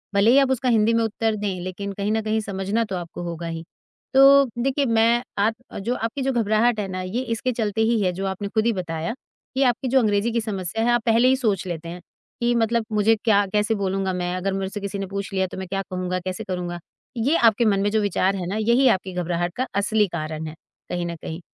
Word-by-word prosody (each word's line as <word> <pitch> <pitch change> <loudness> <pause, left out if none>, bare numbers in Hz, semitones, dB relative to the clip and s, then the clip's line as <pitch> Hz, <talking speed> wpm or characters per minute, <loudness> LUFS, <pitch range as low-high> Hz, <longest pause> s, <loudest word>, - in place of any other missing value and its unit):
भले 200 +4 +5
ही 270 - +6
आप 270 -1 +3
उसका 255 0 0
हिंदी 225 -1 +3
में 230 - +2
उत्तर 225 0 0
दें, 200 -3 -3
लेकिन 185 +2 -5
कहीं 200 +1 -2
न 220 0 +1
कहीं 220 0 0
समझना 200 +2 -1
तो 205 -4 -4
आपको 175 0 -7
होगा 170 -1 -5
ही। 165 0 -5 0.5
तो 275 +1 +8
देखिए, 270 +3 +1
मैं 230 0 +3
आप 210 +3 +2 0.2
अ, - - -6
जो 235 +5 -1
आपकी 230 +5 -3
जो 270 0 +1
घबराहट 225 0 +2
है 200 - -2
ना, 185 0 -4
ये 185 +7 -2
इसके 240 0 -2
चलते 220 -2 -1
ही 225 0 +2
है 185 -2 +2
जो 190 +2 -4
आपने 190 +1 -3
खुद 215 +2 0
ही 235 - +3
बताया। 170 +1 -3 0.4
ये 275 - +4
आपकी 250 +1 +1
जो 265 +1 +4
अंग्रेज़ी 215 0 +1
की 235 - 0
समस्या 210 -1 -2
है, 240 - +3
आप 240 -1 +2
पहले 230 +2 +4
ही 260 - +5
सोच 215 -8 0
लेते 170 -1 -5
हैं, 175 +1 -8 0.4
कि 240 0 +2
मतलब 230 0 +1
मुझे 215 +1 +3
क्या 205 -3 +4
कैसे 210 +1 +2
बोलूँगा 195 -1 -1
मैं, 180 0 -2
अगर 190 +1 -2
मुझसे 195 +1 -3
किसी 200 0 -4
ने 195 - -2
पूछ 200 +1 -5
लिया 190 -1 +1
तो - - -9
मैं 190 0 -5
क्या 195 +2 -2
कहूँगा, 185 0 -2
कैसे 185 0 -5
करूँगा। 175 -2 -4 0.4
ये 260 +8 +2
आपके 235 -5 +4
मन 200 -2 +3
में 205 - +2
जो 220 0 +2
विचार 195 -1 +1
है 185 -2 -4
ना, 195 - -3
यही 235 +5 +3
आपकी 190 -3 0
घबराहट 175 0 -2
का 255 - -1
असली 210 +1 +2
कारण 155 -2 -4
है, 155 - -8 0.3
कहीं 175 -1 -2
न 170 - -4
कहीं 160 - -6
205 Hz, 245 wpm, -23 LUFS, 185-230 Hz, 0.5 s, तो